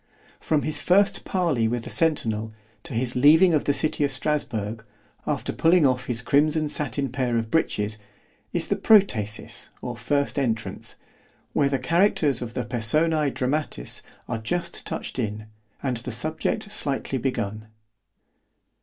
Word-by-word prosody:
——From 155 -2 0
his 155 - -1
first 195 +3 +3
parley 165 -12 +1
with 120 0 -2
the - - -7
centinel, 110 -9 +1 0.3
to - - -6
his 120 +1 -1
leaving 160 +8 +6
the 150 -2 +2
city 150 +1 0
of 140 - +2
Strasburg, 115 -9 -2 0.4
after - - -1
pulling 165 -1 +4
off 125 -2 +1
his 120 -1 -3
crimson 155 +3 +2
sattin 140 -1 -1
pair 125 -2 0
of 115 -1 -2
breeches, 105 -9 0 0.5
is - - 0
the - - +1
Protasis 125 - +2
or 120 -1 -4
first 140 +5 0
entrance——where 125 +3 -3
the 135 - +1
characters 150 - +2
of 120 -1 -6
the 125 -3 -2
Personæ 150 +6 +2
Dramatis 130 - -1 0.3
are - - -2
just 170 +10 -3
touched - - -4
in, 110 -2 -3 0.4
and 130 -3 0
the 125 +2 -6
subject 155 - -2
slightly 140 -7 -1
begun. 110 -4 -3
135 Hz, 140 wpm, -25 LUFS, 115-155 Hz, 0.5 s, leaving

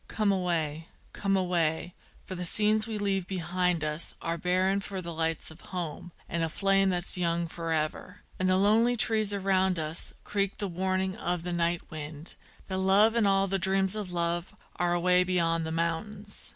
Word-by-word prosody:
_ - - -30
Come 210 -2 +1
away! 165 -4 -1 0.3
come 195 -1 +1
away! 175 -2 0 0.3
for 190 - -6
the 180 -1 -4
scenes 215 +4 +3
we 220 -2 -3
leave 195 -3 -1
behind 180 -2 0
us 150 +1 -2
Are 165 0 -2
barren 185 +3 +1
for 195 -1 -5
the 170 -2 -5
lights 160 0 -1
of 160 - -14
home 175 -1 -5 0.2
and 170 - -2
a 165 - 0
flame 195 +2 +2
that's 180 0 -1
young 170 -1 +1
forever; 165 +3 -3 0.2
And 185 0 +2
the 185 - +4
lonely 220 +5 +4
trees 215 -1 +3
around 190 -2 +1
us 155 +1 -3
creak 200 -1 -1
the 205 - -2
warning 185 +1 -1
of 175 -1 -2
the 180 0 -3
night 170 0 -1
wind, 155 0 -6 0.3
That 190 -1 -2
love 200 +4 +5
and 230 -3 +3
all 195 0 +3
the 195 0 -1
dreams 190 +1 +3
of 205 -4 -4
love 170 0 -1 0.2
are 175 0 +1
away 180 +1 +4
beyond 165 -3 +1
the - - -3
mountains. 195 +6 -3
180 Hz, 185 wpm, -29 LUFS, 170-195 Hz, 0.3 s, love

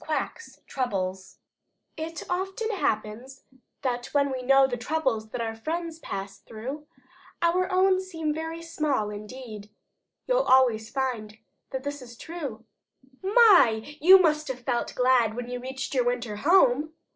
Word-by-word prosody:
QUACK'S 315 +8 -4
TROUBLES 190 -7 -3 0.6
It 320 +1 -6
often 385 +5 -2
happens 240 - -3 0.7
when 280 -1 +2
we 260 -1 -3
know 270 +1 +5
The 260 -2 -2
troubles 245 -4 -1
that 240 - -4
our 225 -1 -2
friends 325 +7 -4
pass 195 -8 -6
through, 265 +7 -8 0.6
Our 365 +2 +2
own 375 0 +3
seem 325 -5 -3
very 325 +1 -5
small 295 -10 -1
indeed; 210 0 -9 0.6
You'll - - +2
always 245 - +3
find 240 -6 -3 0.3
that 265 -1 -5
this 285 0 -5
is 240 -2 -12
true. 280 -10 -7 0.6
"My, 365 - +5
you 375 +4 +9
must 305 -3 +2
have 255 -2 -5
felt 240 -1 -2
glad 250 -3 +3
when 245 0 -5
you 250 0 -5
reached 265 +2 -5
your 255 -3 +2
winter 240 -3 -2
home!" 305 - +3
265 Hz, 140 wpm, -26 LUFS, 230-325 Hz, 0.7 s, you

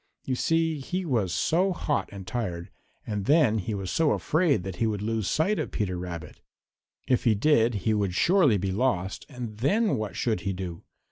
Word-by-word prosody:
You 130 - -1
see 165 +3 +1
he 180 +7 -3
was 115 - 0
so 180 - +2
hot 150 -4 -1
and 100 -2 -8
tired, 90 -7 -4 0.3
and 105 -2 -3
then 140 -7 +4
he 105 +2 -3
was 95 -2 -4
so 160 -2 +3
afraid 155 - +1
that 95 -1 -6
he 115 - +1
would 105 -2 -2
lose 110 -2 -1
sight 190 +7 +1
of - - -2
Peter 100 -4 -2
Rabbit. 85 -3 -7 0.7
If 130 -1 +1
he 115 -3 +4
did 115 -1 +3
he 110 - +3
would 100 -4 0
surely 165 - +4
be 95 0 -2
lost, 95 -4 -1
and 120 -6 -7
then 205 - +2
what 105 -4 -4
should 110 -5 0
he 95 +2 -2
do? 90 -3 -6
110 Hz, 195 wpm, -27 LUFS, 95-150 Hz, 0.7 s, then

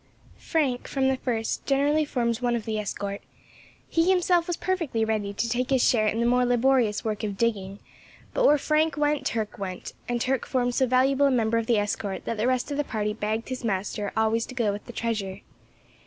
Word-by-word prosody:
Frank, 275 -7 -1
from 265 -1 +1
the 265 - +1
first, 230 -4 -2
generally 290 +3 +2
formed 235 -4 -1
one 240 -1 +1
of 230 - -3
the 220 -2 -2
escort; 200 -1 -4 0.7
he 330 +2 +2
himself 355 -2 +3
was 350 - -2
perfectly 330 -12 -1
ready 215 -2 -1
to 215 +3 -2
take 245 +2 -1
his 265 -2 +3
share 215 -3 +3
in 220 +2 0
the 235 - +2
more 250 +1 +3
laborious 245 -3 +2
work 215 -1 -2
of 205 -2 -3
digging, 200 -4 -1 0.6
but - - +1
where 295 - +6
Frank 305 +2 +1
went 295 -1 +1
Turk 220 -3 -3
went, 185 -2 -5 0.2
and 240 0 0
Turk 260 +1 -1
formed 245 -2 0
so 260 +1 +2
valuable 265 +3 +3
a - - +2
member 230 -2 +2
of 225 - -4
the 235 - +3
escort 205 -1 -2
that 230 - -2
the 220 +3 +1
rest 255 +2 0
of 285 - -2
the 295 - +1
party 210 -5 -2
begged 220 +2 -3
his 255 -1 -5
master 205 -1 -2
always 220 +1 +1
to 255 - -9
go 230 -5 +1
with 205 +1 -7
the - - -7
treasure. 210 -5 -3
235 Hz, 215 wpm, -26 LUFS, 215-270 Hz, 0.7 s, where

